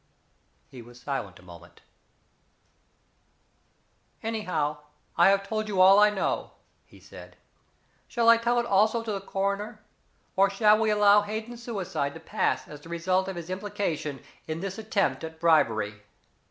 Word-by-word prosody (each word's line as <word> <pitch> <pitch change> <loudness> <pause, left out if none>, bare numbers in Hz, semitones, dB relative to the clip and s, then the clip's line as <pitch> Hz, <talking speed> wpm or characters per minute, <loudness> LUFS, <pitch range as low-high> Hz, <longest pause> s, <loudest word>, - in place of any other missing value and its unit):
He 125 - -12
was 120 +1 -15
silent 125 -10 -5
a - - -18
moment. 85 -1 -15 2.4
"Anyhow, 185 -10 -2 0.4
I 175 - +6
have 195 0 +1
told 215 -1 -2
you 200 -3 -2
all 190 +2 +7
I 210 0 +6
know," 205 -2 -2 0.3
he - - -18
said. - - -13 0.7
"Shall 235 -2 0
I 230 0 +8
tell 240 +1 +1
it 235 - -1
also 220 +2 +2
to 225 - -4
the 200 -2 -3
coroner? 200 +2 -3 0.6
Or 195 +1 +4
shall 210 +2 +4
we 220 -1 +1
allow 210 -1 +5
Hayden's 220 +3 -6
suicide 190 -11 -3
to - - -8
pass - - -1
as 150 -1 -11
the 165 - -14
result 185 +3 0
of 190 - -5
his 170 +1 -7
implication 170 -7 -3 0.3
in 160 0 -4
this 195 +3 -5
attempt 215 -5 -1
at 160 0 -8
bribery? 110 -11 +2
195 Hz, 155 wpm, -27 LUFS, 155-215 Hz, 2.4 s, I